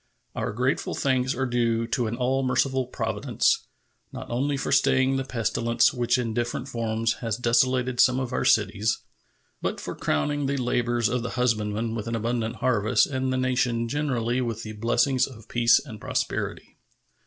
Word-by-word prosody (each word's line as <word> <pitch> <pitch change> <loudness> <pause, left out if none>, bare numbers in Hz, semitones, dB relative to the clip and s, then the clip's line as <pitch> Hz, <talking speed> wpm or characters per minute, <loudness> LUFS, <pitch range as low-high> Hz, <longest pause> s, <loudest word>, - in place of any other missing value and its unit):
Our - - -2
grateful 125 +5 -1
thanks 130 -1 +1
are 130 +2 -1
due 115 -2 +1
to 120 -1 0
an 110 - -3
all 130 +2 0
merciful 130 0 +1
Providence, - - 0 0.4
not - - -8
only 140 +4 0
for 135 - -3
staying 135 -1 +3
the 135 - -1
pestilence 115 -1 +1
which 120 -1 +1
in 115 -3 -2
different 120 +2 -2
forms 115 -2 -1
has 115 -3 -2
desolated 125 +1 +1
some 130 0 +5
of 130 -2 -4
our - - 0
cities, 110 +3 +2 0.6
but - - -2
for - - -5
crowning 145 - -1
the 140 +1 -1
labors 120 -2 +1
of 125 0 -1
the 120 0 -5
husbandman 110 -2 0
with 115 -1 -4
an 115 - -2
abundant 115 +1 -2
harvest 110 -4 +2
and 130 -1 -2
the 130 - 0
nation 125 -2 0
generally 130 -3 -1
with 115 -2 -3
the 110 - -6
blessings 120 +4 +1
of 115 -4 -13
peace 120 -1 +4
and 115 -7 -7
prosperity. - - -3
120 Hz, 170 wpm, -25 LUFS, 115-130 Hz, 0.6 s, some